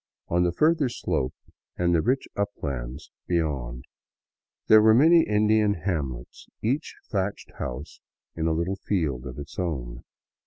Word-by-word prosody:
On 85 Hz, +1 st, +2 dB
the 90 Hz, -, +2 dB
further 155 Hz, -, +3 dB
slope 65 Hz, -, -2 dB, 0.4 s
and 85 Hz, 0 st, +2 dB
the 85 Hz, -, +4 dB
rich 130 Hz, +7 st, 0 dB
uplands 70 Hz, -9 st, -4 dB, 0.2 s
be 90 Hz, -, 0 dB
yond 65 Hz, -7 st, -2 dB, 0.8 s
there 110 Hz, 0 st, +7 dB
were 110 Hz, 0 st, +6 dB
many 165 Hz, +6 st, +7 dB
Indian 105 Hz, 0 st, +3 dB
hamlets, 75 Hz, -9 st, -4 dB, 0.2 s
each 135 Hz, +8 st, -1 dB, 0.2 s
thatched 100 Hz, 0 st, -2 dB
house 70 Hz, +6 st, -6 dB, 0.4 s
in 80 Hz, 0 st, -1 dB
a -, -, +2 dB
little 85 Hz, +4 st, -1 dB
field 75 Hz, -11 st, -1 dB
of 65 Hz, -, -8 dB
its 70 Hz, +4 st, -8 dB
own. 60 Hz, -9 st, -3 dB
85 Hz, 145 wpm, -26 LUFS, 70-105 Hz, 0.8 s, there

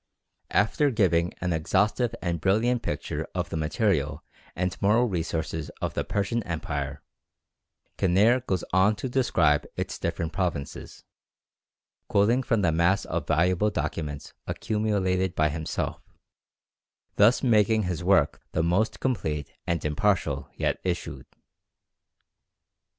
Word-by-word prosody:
After 125 Hz, +8 st, +2 dB
giving 90 Hz, -8 st, +2 dB
an 90 Hz, -1 st, 0 dB
exhaustive 100 Hz, +8 st, +1 dB
and 85 Hz, -3 st, -1 dB
brilliant 115 Hz, +6 st, +2 dB
picture -, -, -3 dB
of -, -, -2 dB
the -, -, -3 dB
material 80 Hz, -, 0 dB, 0.3 s
and 90 Hz, +1 st, -1 dB
moral 110 Hz, +5 st, +4 dB
resources 80 Hz, -4 st, -3 dB
of -, -, -2 dB
the -, -, -1 dB
Persian 100 Hz, +4 st, -1 dB
Empire, 75 Hz, -6 st, -4 dB, 1.0 s
Kinneir 105 Hz, +7 st, +4 dB
goes 95 Hz, -3 st, 0 dB
on 95 Hz, +3 st, +4 dB
to 105 Hz, -, -4 dB
describe 90 Hz, -, +2 dB
its -, -, -4 dB
different 80 Hz, -1 st, -2 dB
provinces, 85 Hz, -6 st, -4 dB, 1.0 s
quoting 110 Hz, +6 st, +3 dB
from 115 Hz, -5 st, 0 dB
the 85 Hz, -, +3 dB
mass 85 Hz, +4 st, +2 dB
of -, -, -3 dB
valuable 90 Hz, +6 st, +2 dB
documents 75 Hz, -7 st, -4 dB
accumulated 95 Hz, -4 st, 0 dB
by 75 Hz, 0 st, +3 dB
himself, 80 Hz, +1 st, -3 dB, 1.2 s
thus 115 Hz, +7 st, +5 dB
making 110 Hz, -2 st, +3 dB
his 90 Hz, -3 st, -3 dB
work 90 Hz, -5 st, +3 dB
the 80 Hz, -, +1 dB
most 90 Hz, +7 st, +1 dB
complete 75 Hz, -, -2 dB, 0.2 s
and 85 Hz, -2 st, -1 dB
impartial 75 Hz, -3 st, 0 dB
yet -, -, 0 dB
issued. 90 Hz, -1 st, -3 dB
90 Hz, 120 wpm, -26 LUFS, 80-105 Hz, 1.2 s, thus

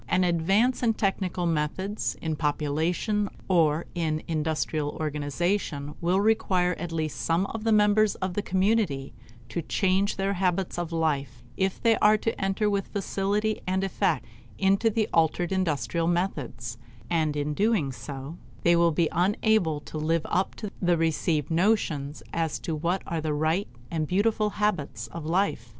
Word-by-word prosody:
An 185 Hz, 0 st, +3 dB
advance 195 Hz, +9 st, +2 dB
in 230 Hz, -3 st, +2 dB
technical 190 Hz, -3 st, -1 dB
methods, 170 Hz, +6 st, -1 dB
in 160 Hz, -1 st, -1 dB
population, 160 Hz, +8 st, 0 dB, 0.2 s
or 165 Hz, -3 st, +3 dB
in 155 Hz, -3 st, -1 dB
industrial 155 Hz, -2 st, -1 dB
organization 150 Hz, 0 st, -1 dB
will 180 Hz, +3 st, +2 dB
require 190 Hz, -4 st, +2 dB
at 175 Hz, +1 st, -4 dB
least 155 Hz, -2 st, -2 dB
some 170 Hz, +3 st, +1 dB
of 215 Hz, +2 st, -5 dB
the 225 Hz, -, +3 dB
members 210 Hz, 0 st, +4 dB
of 185 Hz, -1 st, -3 dB
the 205 Hz, -, -1 dB
community 190 Hz, -8 st, 0 dB, 0.4 s
to 170 Hz, -, -2 dB
change 190 Hz, +4 st, +1 dB
their 195 Hz, +1 st, 0 dB
habits 185 Hz, -1 st, 0 dB
of 175 Hz, -1 st, -3 dB
life, 140 Hz, -7 st, -1 dB
if 190 Hz, 0 st, 0 dB
they 225 Hz, -2 st, +3 dB
are 215 Hz, +1 st, +5 dB
to 225 Hz, +1 st, -1 dB
enter 195 Hz, +2 st, +1 dB
with 200 Hz, -2 st, 0 dB
facility 205 Hz, +2 st, -1 dB
and 190 Hz, +1 st, +1 dB
effect 195 Hz, -, 0 dB, 0.3 s
into 195 Hz, +3 st, +3 dB
the 220 Hz, 0 st, 0 dB
altered 165 Hz, +2 st, +2 dB
industrial 165 Hz, -4 st, 0 dB
methods; 130 Hz, -, -2 dB, 0.3 s
and 155 Hz, -3 st, +1 dB
in 150 Hz, 0 st, -1 dB
doing 200 Hz, -6 st, +1 dB
so 140 Hz, +4 st, -7 dB, 0.3 s
they 170 Hz, 0 st, +5 dB
will 170 Hz, 0 st, +4 dB
be 165 Hz, +1 st, +2 dB
unable 180 Hz, -2 st, +2 dB
to 155 Hz, -, -7 dB
live 160 Hz, +1 st, 0 dB
up 185 Hz, +2 st, 0 dB
to 210 Hz, -3 st, -6 dB
the 175 Hz, -2 st, +3 dB
received 160 Hz, -2 st, 0 dB
notions 160 Hz, -6 st, +1 dB
as 165 Hz, -2 st, -1 dB
to 165 Hz, -, -4 dB
what 170 Hz, +5 st, -1 dB
are 165 Hz, -2 st, -2 dB
the 155 Hz, -1 st, -1 dB
right 160 Hz, +6 st, +1 dB, 0.2 s
and 160 Hz, -2 st, -1 dB
beautiful 210 Hz, +3 st, +2 dB
habits 180 Hz, -, -1 dB
of 160 Hz, +3 st, -7 dB
life. 170 Hz, -, 0 dB
175 Hz, 160 wpm, -27 LUFS, 155-195 Hz, 0.4 s, are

